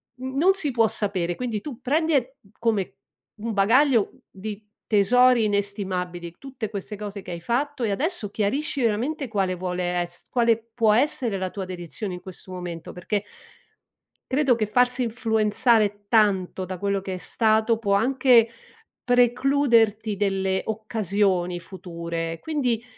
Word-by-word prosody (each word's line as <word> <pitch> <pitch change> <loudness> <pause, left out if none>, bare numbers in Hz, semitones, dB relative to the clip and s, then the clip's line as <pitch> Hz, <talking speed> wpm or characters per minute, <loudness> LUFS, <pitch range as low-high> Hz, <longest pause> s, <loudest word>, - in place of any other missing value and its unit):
mhmm, 260 +1 -6
non 370 +6 +5
si 305 -8 -1
può 230 -2 +3
sapere 185 -6 -1
quindi 235 -4 -3
tu 260 -4 -8
prendi 315 +5 +1
e 265 0 0 0.2
come 220 -5 0 0.5
un 230 - -2
bagaglio 230 +3 +4 0.2
di 205 +2 -7 0.2
tesori 235 +3 +4
inestimabili 185 -4 -2
tutte 260 -6 -6
queste 210 0 -6
cose 205 -1 -6
che - - -8
hai 170 -1 -6
fatto, 265 - -1
e 220 - +1
adesso 280 - -1
chiarisci 265 +8 -1
veramente 255 +7 0
quale 190 -4 0
vuole 180 0 -2
ess 175 0 -7
quale 235 -2 +3 0.2
può 225 -3 +3
essere 240 -4 +2
la 185 0 -2
tua 195 0 -5
dedizione 185 +2 -5
in 180 - -8
questo 185 0 -11
momento, 175 -2 -6
perché 200 +3 -2 1.1
credo 265 -3 +3
che 215 -2 0
farsi 250 +3 +2
influenzare 220 -2 +1
tanto 195 -4 +2
da 185 - -5
quello 200 +1 -1
che 190 -1 -5
è - - -3
stato 220 +3 +2
può 200 -3 +1
anche 240 +1 +4 0.5
precluderti 245 -4 +3
delle 190 -1 0
occasioni 200 -5 0
future, 170 -2 -5
quindi 250 - -1
215 Hz, 145 wpm, -24 LUFS, 190-245 Hz, 1.1 s, non